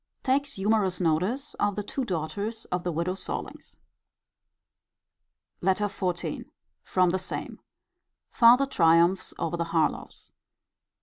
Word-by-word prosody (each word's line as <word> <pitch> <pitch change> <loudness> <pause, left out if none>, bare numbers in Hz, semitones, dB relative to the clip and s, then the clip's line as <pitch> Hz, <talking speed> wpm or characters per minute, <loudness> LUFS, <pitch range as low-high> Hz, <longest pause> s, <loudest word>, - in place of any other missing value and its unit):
Takes 280 +1 +1
humourous 195 -2 +1
notice 185 - 0
of 205 -1 +1
the 210 - -3
two 265 +6 -3
daughters 200 +5 -3
of 180 -1 -1
the 180 - -1
widow 170 +3 -1
Sorlings. 190 - -7 1.8
LETTER 190 +3 +2
XIV. 185 -3 -3 0.4
From 185 -2 +2
the 190 - 0
same. 185 - -5 0.7
Farther 245 +3 +6
triumphs 170 -6 +3
over 170 +1 -2
the 170 - -1
Harlowes. 165 -1 -2
190 Hz, 115 wpm, -27 LUFS, 170-220 Hz, 1.8 s, Farther